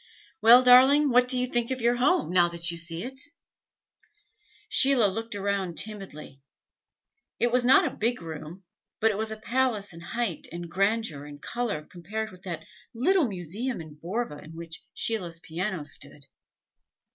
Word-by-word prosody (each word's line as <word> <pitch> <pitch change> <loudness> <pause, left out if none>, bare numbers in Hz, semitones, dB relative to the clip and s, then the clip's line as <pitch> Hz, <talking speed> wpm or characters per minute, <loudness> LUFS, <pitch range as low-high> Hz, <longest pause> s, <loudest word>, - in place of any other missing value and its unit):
"Well, 235 +3 +8
darling, 265 +3 +7
what 250 +1 +5
do 255 - +1
you 250 - +1
think 240 -2 -1
of 260 -1 -2
your 240 +1 +2
home, 290 - +2
now 175 -1 +4
that 170 0 -1
you 170 - -6
see 165 +1 -3
it?" 265 +1 -6 1.5
Sheila 265 -4 +4
looked 225 +3 -2
around 195 -3 -2
timidly. 190 -10 -3 1.0
It 240 - +2
was 250 0 +3
not 265 +10 +6
a 270 - -3
big 235 +3 0
room, 165 +2 -8 0.4
but 220 0 +3
it 200 - -4
was 220 0 -2
a 220 - -6
palace 225 -4 -1
in 165 - -11
height 225 -1 -3
and 170 0 -7
grandeur 195 -5 0
and 145 -1 -10
color 225 -5 -3
compared 210 +7 -5
with 185 -1 -15
that 170 -4 -6 0.3
little 320 +6 +3
museum 200 +6 -3
in 155 -2 -9
Borva 170 +1 -4
in 160 +1 -12
which 165 0 -8
Sheila's 180 -7 -3
piano 175 +1 -4
stood. 145 0 -8
205 Hz, 165 wpm, -27 LUFS, 170-245 Hz, 1.5 s, Well